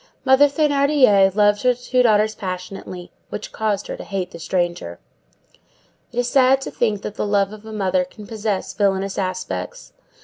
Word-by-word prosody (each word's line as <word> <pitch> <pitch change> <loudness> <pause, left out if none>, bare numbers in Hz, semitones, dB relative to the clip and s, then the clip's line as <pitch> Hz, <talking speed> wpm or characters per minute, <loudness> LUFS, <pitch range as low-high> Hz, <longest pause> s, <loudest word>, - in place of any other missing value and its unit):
Mother 265 +2 +6
Thénardier 280 - +3
loved 205 -1 +3
her 250 -1 +3
two 250 +1 0
daughters 215 -2 +3
passionately, 185 -2 -7 0.2
which 210 - -6
caused 210 -2 -1
her - - -5
to - - -9
hate 190 -2 -4
the 170 - -10
stranger. 175 - -2 1.1
It - - -12
is 245 0 +1
sad 265 0 +4
to - - -6
think 210 -4 -1
that 210 - -5
the 210 - -3
love 200 0 +1
of 215 +1 -12
a - - -8
mother 190 -3 0
can 205 +4 -12
possess 210 -3 -3
villainous 195 -1 0
aspects. 185 - -4
205 Hz, 170 wpm, -21 LUFS, 190-240 Hz, 1.1 s, Mother